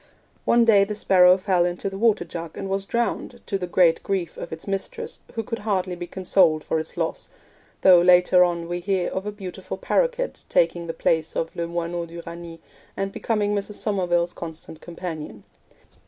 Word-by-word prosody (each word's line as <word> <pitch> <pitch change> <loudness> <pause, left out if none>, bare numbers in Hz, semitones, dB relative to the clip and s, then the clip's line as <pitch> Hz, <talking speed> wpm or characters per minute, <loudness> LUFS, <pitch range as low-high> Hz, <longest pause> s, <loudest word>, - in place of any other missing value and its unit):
One 235 0 +4
day 205 -3 +6
the 210 +1 -3
sparrow 185 -3 +5
fell 185 -2 +2
into 175 +2 -2
the 195 - -4
water 210 -3 +2
jug 165 -1 -7
and 195 - -4
was 195 0 -2
drowned, 235 +2 -2
to 195 - -2
the 180 - -3
great 175 -2 +3
grief 190 -4 -2
of - - -7
its 160 0 -7
mistress 195 -1 -4 0.2
who 225 - -2
could 230 +1 -4
hardly 190 -4 -1
be 175 0 -6
consoled 175 -4 +2
for 160 - -1
its 160 - -6
loss, 165 -1 -2 0.5
though 180 -2 +7
later 180 0 +6
on 170 -1 -1
we 175 +1 -3
hear 185 0 -1
of 190 +2 -4
a - - -2
beautiful 195 -4 -7
paroquet - - 0 0.2
taking 485 - +1
the 165 - -4
place 160 -1 0
of 165 - -2
le 170 0 -2
moineau 170 0 -3
d'Uranie, 170 0 -9 0.4
and 195 0 -2
becoming 210 -1 -1
Mrs. 205 0 -3
Somerville's 175 -5 0
constant 160 -1 -8
companion. 160 - -7
180 Hz, 185 wpm, -24 LUFS, 170-200 Hz, 0.5 s, though